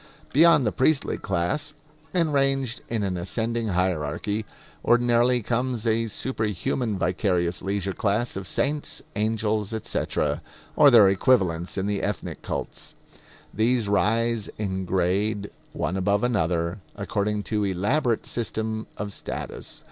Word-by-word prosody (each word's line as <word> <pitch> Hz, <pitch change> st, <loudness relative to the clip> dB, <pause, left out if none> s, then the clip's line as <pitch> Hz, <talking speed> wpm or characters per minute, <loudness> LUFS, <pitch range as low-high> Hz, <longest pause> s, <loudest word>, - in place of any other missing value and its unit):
Beyond 160 Hz, -2 st, +6 dB
the 105 Hz, -, +2 dB
priestly 140 Hz, +2 st, +1 dB
class, 145 Hz, -, -1 dB, 0.4 s
and 165 Hz, -4 st, +1 dB
ranged 135 Hz, -3 st, +1 dB
in 115 Hz, -3 st, -1 dB
an 95 Hz, -2 st, -1 dB
ascending 115 Hz, +5 st, -1 dB
hierarchy, 90 Hz, +3 st, -1 dB, 0.4 s
ordinarily 120 Hz, 0 st, +3 dB
comes 120 Hz, 0 st, -1 dB
a 115 Hz, 0 st, +1 dB
superhuman 110 Hz, -1 st, -2 dB
vicarious 90 Hz, -1 st, 0 dB
leisure 100 Hz, 0 st, -2 dB
class 110 Hz, +5 st, 0 dB
of 95 Hz, -1 st, -5 dB
saints, 145 Hz, +8 st, -1 dB
angels, 110 Hz, 0 st, 0 dB
etc. 75 Hz, -7 st, -1 dB, 0.3 s
or 150 Hz, -1 st, +8 dB
their 115 Hz, -6 st, +8 dB
equivalents 95 Hz, -5 st, +2 dB
in 95 Hz, -, 0 dB
the 100 Hz, -1 st, -1 dB
ethnic 105 Hz, -, -3 dB
cults. -, -, -5 dB, 0.6 s
These 115 Hz, 0 st, +2 dB
rise 115 Hz, +2 st, +1 dB
in 95 Hz, -3 st, -2 dB
grade, 100 Hz, +3 st, 0 dB, 0.2 s
one 95 Hz, -, -2 dB
above 100 Hz, +2 st, +1 dB
another, 85 Hz, -5 st, 0 dB, 0.2 s
according 105 Hz, +1 st, -1 dB
to 105 Hz, -1 st, +2 dB
elaborate 105 Hz, -, +1 dB
system 110 Hz, -1 st, -3 dB
of 100 Hz, -1 st, -4 dB
status. -, -, -5 dB
105 Hz, 125 wpm, -25 LUFS, 95-120 Hz, 0.6 s, or